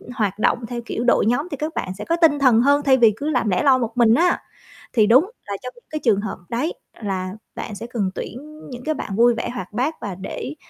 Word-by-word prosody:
hoạt 210 -3 -1
động 235 +2 +1
theo 240 -1 -4
kiểu 235 - -3
đội 240 - +3
nhóm 260 +9 +1
thì 285 - -4
các 305 +3 -3
bạn 185 - -3
sẽ 210 - -6
có 335 - +1
tinh 290 -3 +5
thần 245 -4 +5
hơn 285 +2 +4
thay 265 -2 +5
vì 225 -4 +5
cứ 295 +2 -2
làm 245 -7 +1
lẻ 180 - +1
loi 265 -2 +5
một 235 0 -3
mình 230 -2 +5
á. 350 +6 +3 0.5
Thì 215 -4 +4
đúng 255 +7 +6 0.2
là 200 -1 -4
trong 250 - -6
những 240 - -20
cái 310 - -3
trường 205 -5 +3
hợp 220 - -5
đấy 255 +9 -1 0.3
là 190 -2 -3 0.2
bạn 210 - -6
sẽ 230 - -7
cần 215 -6 -1
tuyển 305 +5 -8
những 250 -1 -8
cái 310 0 -1
bạn 195 - -5
vui 240 +1 +5
vẻ - - -3
hoạt 190 0 -6
bát 270 +8 0
và 200 -4 -4
để 225 - -6
240 Hz, 260 wpm, -22 LUFS, 215-280 Hz, 0.5 s, đúng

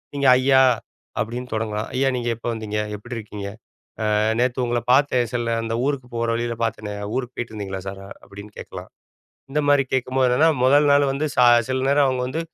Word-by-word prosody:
நீங்க 140 -1 +1
ஐயா! 130 +1 +4 0.6
அப்பிடின்னு 120 +4 -4
தொடங்கலாம். 110 -1 -2
ஐயா! 135 +1 +2
நீங்க 120 -1 -2
எப்போ 115 - -8
வந்தீங்க? 110 -1 -4 0.2
எப்பிடி 120 +4 -8
இருக்கீங்க? 105 -2 -7 0.7
ஆ - - +2 0.2
நேத்து 125 +1 +1
உங்கள 120 0 0
பார்த்தேன். 130 -3 +3
சில 120 -1 -1
அந்த 115 0 -3
ஊருக்கு 140 -3 -2
போற 115 0 -1
வழியில 120 0 -2
பார்த்தேனே! 105 -2 -3 0.2
ஊருக்கு 125 -1 -4
போயிட்டுருந்தீங்களா 100 -5 -5
சார்? 95 0 -7 0.2
அப்பிடின்னு 100 +1 -12
கேட்கலாம். - - -9 0.6
இந்தமாரி 145 -1 +2
கேட்கும்போது 130 0 +1
என்னன்னா, 145 +7 +4
முதல் 145 +3 +5
நாள் 140 -1 +4
வந்து 140 +3 -1
ச - - -5 0.3
சில 130 - 0
நேரம் 140 0 +4
அவுங்க 130 -1 -1
வந்து 155 +5 -3
125 Hz, 170 wpm, -22 LUFS, 110-135 Hz, 0.7 s, முதல்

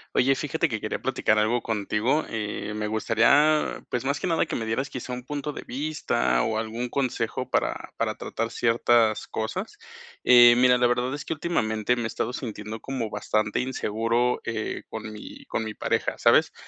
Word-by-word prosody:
Oye, 135 +2 +4
fíjate 160 +4 -1
que 110 -4 -3
quería 105 - -3
platicar 115 -4 +1
algo 110 +3 +2
contigo, 110 +6 0
eh, 105 -1 -4
me 105 0 -3
gustaría, 120 +8 +3
pues, 125 +1 -2
más 140 +1 0
que - - -3
nada 165 -3 +1
que - - -3
me 115 - -2
dieras 115 +6 -1
quizá 125 0 -6
un 125 0 -5
punto 145 +2 -4
de - - -6
vista 130 - 0
o 110 - 0
algún 115 +2 -3
consejo 130 -1 -2
para - - -1
para - - -1
tratar 115 - -3
ciertas 115 -1 +2
cosas. 185 - -4 0.5
Eh, 120 -1 +8
mira, 125 0 +5
la 120 - +4
verdad 125 +2 0
es 145 - -6
que - - -2
últimamente 120 -9 0
me 120 -2 -3
he - - +1
estado 120 - -3
sintiendo 110 -3 -6
como 125 -5 -4
bastante 105 0 0
inseguro, 120 -1 0
eh, 110 -2 -3
con 110 -1 -6
mi 105 - -10
con 110 - -2
mi 110 -1 -6
pareja, - - -1
¿sabes?, - - +4
120 Hz, 185 wpm, -26 LUFS, 110-130 Hz, 0.5 s, Eh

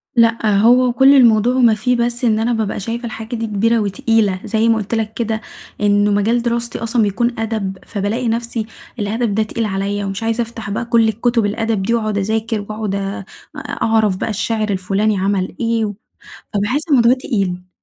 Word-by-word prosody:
لأ، 230 -3 +3
هو 245 +2 +4
كل 270 +2 +6
الموضوع 240 -1 +4
وما 240 -3 +5
فيه 250 +4 0
بس 240 +1 0
إن 220 -2 +2
أنا 235 +2 +1
بابقى 220 -2 -2
شايفة 230 +4 -4
الحاجة 225 +1 -6
دي 225 -1 -3
كبيرة 225 +3 +1
وتقيلة، 205 -1 +1
زي 225 0 +1
ما 230 - +4
قُلت 215 +2 -3
لك 220 -1 -2
كده، 220 -1 -2 0.4
إنه 205 0 +3
مجال 220 +4 +2
دراستي 235 0 -2
أصلًا 230 +1 0
بيكون 230 +3 0
أدب، 215 -4 -3
فبالاقي 220 +4 -2
نَفسي 230 -1 -2 0.3
الأدب 215 +1 -1
ده 220 - +2
تقيل 225 +1 -3
عليَّ، 200 +1 -2
ومش 195 +2 -4
عايزة 225 +1 0
أفتح 230 -2 -6
بقى 210 +4 -2
كل 230 -1 +3
الكتب 230 0 +1
الأدب 220 0 -1
دي، 230 - 0
وأقعد 215 -3 -1
أذاكر، 220 +2 -1
وأقعد 215 -1 -4
آآ 195 -1 -4 0.3
أعرَف 220 -4 0
بقى - - -3
الشاعر 220 0 -1
الفلاني 195 +2 0
عمل 190 0 -1
إيه، 230 -1 0
و 205 - -4 0.6
فباحس 220 +9 0
الموضوع 240 -3 +5
تقيل. 195 -8 -2
220 Hz, 180 wpm, -18 LUFS, 205-235 Hz, 0.6 s, كل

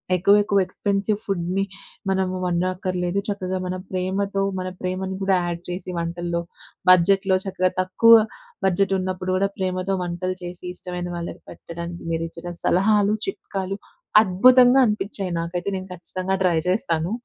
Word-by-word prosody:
ఎక్కువెక్కువ 200 +2 +4
expensive 200 +2 -1
ఫుడ్‌ని 190 0 -1 0.5
మనం 190 -1 +1 0.2
వండక్కర్లేదు. 180 +1 -1
చక్కగా 190 -2 -2
మన 180 - -2 0.2
ప్రేమతో 195 +2 -1 0.2
మన 185 - -3
ప్రేమని 185 +1 -3
గూడా 190 -1 +3
యాడ్ 170 -1 -3
చేసి 180 +1 -5
వంటల్లో, 170 0 -2 0.5
బడ్జెట్‌లో, 190 +2 +5
చక్కగా 185 -1 +1
తక్కువ 230 +5 +6 0.5
బడ్జెట్ 195 +1 +2
ఉన్నప్పుడు 185 0 -3
గూడా 195 +1 +1
ప్రేమతో 185 0 -1
వంటలు 180 +1 -3
చేసి 175 0 -7
ఇష్టమైన 180 -1 -5
వాళ్ళకి 170 - -6
పెట్టడానికి 170 +1 -8
మీరిచ్చిన 165 +1 -4
సలహాలు, 205 +2 +3
చిట్కాలు 195 - -4 0.4
అద్భుతంగా 250 +6 +6
అనిపించాయి 200 -3 -2
నాకైతే. 175 +3 -3
నేను 185 0 -5
ఖచ్చితంగా 185 +2 -3
ట్రై 175 -3 +3
చేస్తాను. 170 -3 0
185 Hz, 125 wpm, -23 LUFS, 175-195 Hz, 0.5 s, తక్కువ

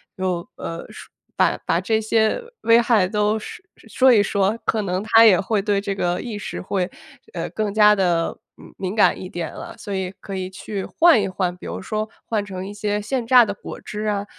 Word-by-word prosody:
有， 185 -2 -2
呃， 165 - -6
说 - - -12 0.2
把 - - +2
把 - - +1
这 220 -1 +1
些 220 - +1 0.2
危 230 +1 +5
害 225 -6 +3
都 210 +2 +1
说 430 - -9 0.3
说 260 -1 +5
一 205 -3 +5
说， 200 +2 0
可 220 - +1
能 185 +1 -2
他 225 +1 +6
也 195 -5 +7
会 200 +1 0
对 200 -1 0
这 200 -1 -2
个 175 -2 -1
意 225 -4 -5
识 - - -6
会 185 -1 -2 0.6
更 215 -2 -1
加 210 0 +6
地， 175 -4 0 0.2
嗯， - - -15
敏 190 +1 -4
感 215 - +3
一 185 - -7
点 170 -3 -5
了， - - -9
所 205 -3 -7
以 190 -1 -2
可 195 - -7
以 185 0 -4
去 195 +1 -6
换 330 - +4
一 200 - -1
换。 180 -1 -2
比 - - -10
如 85 +2 -5
说 215 - -3 0.2
换 215 -3 -1
成 190 -2 -6
一 205 - -7
些 210 0 -2
现 235 +2 -3
榨 245 -1 +7
的 205 - -3
果 - - -9
汁 210 +1 -6
啊， 205 -1 -1
205 Hz, 230 characters per minute, -22 LUFS, 185-220 Hz, 0.6 s, 也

